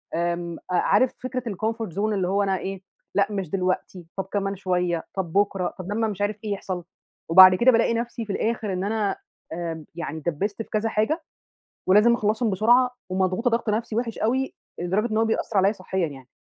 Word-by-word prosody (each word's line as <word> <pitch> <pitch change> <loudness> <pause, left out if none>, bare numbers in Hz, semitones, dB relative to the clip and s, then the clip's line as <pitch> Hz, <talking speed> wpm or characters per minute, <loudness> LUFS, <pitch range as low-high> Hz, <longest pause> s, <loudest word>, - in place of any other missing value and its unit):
آمم، 170 0 -2
عارف 205 +7 +3
فكرة 255 -1 -3
الcomfort 220 -2 -3
zone - - -3
اللي 190 -3 0
هو 200 +2 +2
أنا 190 -1 +1
إيه 195 0 -5 0.3
لأ، 200 0 +4
مش 195 -5 -3
دلوقتي، 185 -1 -2
طب 195 - -2
كمان 200 -1 -1
شوية، 180 -3 -1
طَب 175 -4 -3
بُكرة، 195 -3 +1
طَب 185 +2 -5
لمّا 225 +2 +1
مش 205 -2 -5
عارف 205 0 0
إيه 210 - -3
يحصل، 185 -3 -4 0.5
وبعد 185 +2 +9
كده 250 +6 +5
بالاقي 230 0 +3
نَفسي 235 0 -3
في 200 - -3
الآخر 220 -2 -1
إن 185 +1 -2
أنا 205 -1 0 0.4
آآ، 165 -2 -4
يعني 160 -2 -4
ادّبست 185 +8 -2
في - - -8
كذا 220 +1 0
حاجة 300 +11 0 0.6
ولازم 210 +5 +6
أخلّصهم 220 +1 0
بسرعة 240 +6 +4 0.2
ومضغوطة 185 +6 +1
ضغط 230 -1 0
نَفسي 215 +1 -1
وحش 230 -1 -2
أوي 260 +4 0 0.2
لدرجة 200 +6 0
إن 215 - 0
هو 225 - +3
بيأثر 220 -1 -1
عليّا 195 +1 +5
صحيًا 185 -3 -2
يعني. 135 -3 -11
200 Hz, 190 wpm, -24 LUFS, 185-225 Hz, 0.6 s, وبعد